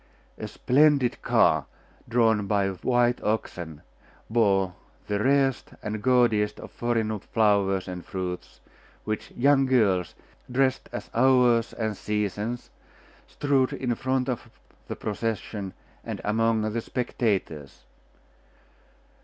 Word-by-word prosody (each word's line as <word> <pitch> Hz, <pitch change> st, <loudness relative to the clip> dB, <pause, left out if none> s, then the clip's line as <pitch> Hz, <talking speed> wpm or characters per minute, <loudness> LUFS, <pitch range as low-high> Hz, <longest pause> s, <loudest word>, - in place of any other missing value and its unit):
A -, -, -4 dB
splendid 140 Hz, -2 st, +3 dB
car, -, -, +3 dB, 0.4 s
drawn 110 Hz, -3 st, +3 dB
by 100 Hz, -1 st, +2 dB
white 120 Hz, +5 st, +1 dB
oxen, 85 Hz, -7 st, -3 dB, 0.5 s
bore 100 Hz, -5 st, +2 dB, 0.3 s
the 105 Hz, 0 st, -1 dB
rarest 135 Hz, -1 st, +2 dB
and 105 Hz, 0 st, -3 dB
gaudiest 115 Hz, -5 st, +2 dB
of -, -, -10 dB
foreign 110 Hz, -3 st, -1 dB
flowers 100 Hz, -3 st, +1 dB
and 90 Hz, -1 st, -6 dB
fruits, 90 Hz, -1 st, -6 dB, 0.4 s
which 110 Hz, -1 st, -4 dB
young 135 Hz, +1 st, +3 dB
girls, 100 Hz, -9 st, +2 dB, 0.4 s
dressed 130 Hz, +1 st, +1 dB
as 120 Hz, -, -7 dB
Hours 125 Hz, -2 st, +4 dB
and 110 Hz, -2 st, -2 dB
Seasons, 105 Hz, +3 st, -3 dB, 0.6 s
strewed 140 Hz, -3 st, +1 dB
in 125 Hz, -2 st, -1 dB
front 130 Hz, +2 st, -1 dB
of 125 Hz, -3 st, -3 dB, 0.4 s
the -, -, -4 dB
procession 105 Hz, -2 st, -3 dB, 0.3 s
and -, -, -5 dB
among 110 Hz, +1 st, +1 dB
the 115 Hz, -, -1 dB
spectators. 100 Hz, -, -2 dB
110 Hz, 110 wpm, -26 LUFS, 100-125 Hz, 0.6 s, Hours